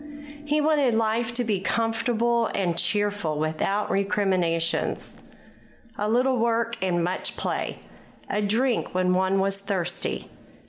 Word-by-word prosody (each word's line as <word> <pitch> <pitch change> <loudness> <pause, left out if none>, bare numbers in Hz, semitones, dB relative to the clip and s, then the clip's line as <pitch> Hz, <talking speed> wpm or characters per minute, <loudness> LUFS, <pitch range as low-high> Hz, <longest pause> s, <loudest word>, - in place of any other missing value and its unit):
He 295 +1 +1
wanted 290 -6 +3
life 225 +1 +1
to 245 - +1
be 210 -5 0
comfortable 230 +2 +1
and 175 -4 0
cheerful, 200 -2 0
without 160 +7 -1
recriminations, 185 -4 0 0.7
a 210 +1 -1
little 250 +3 +2
work 230 0 +1
and 175 -2 +1
much 180 +2 -2
play, - - -3 0.4
a 210 - -1
drink 225 +1 0
when 180 0 +2
one 190 +1 +2
was 195 0 +1
thirsty. 190 -3 -2
205 Hz, 125 wpm, -25 LUFS, 185-230 Hz, 0.7 s, wanted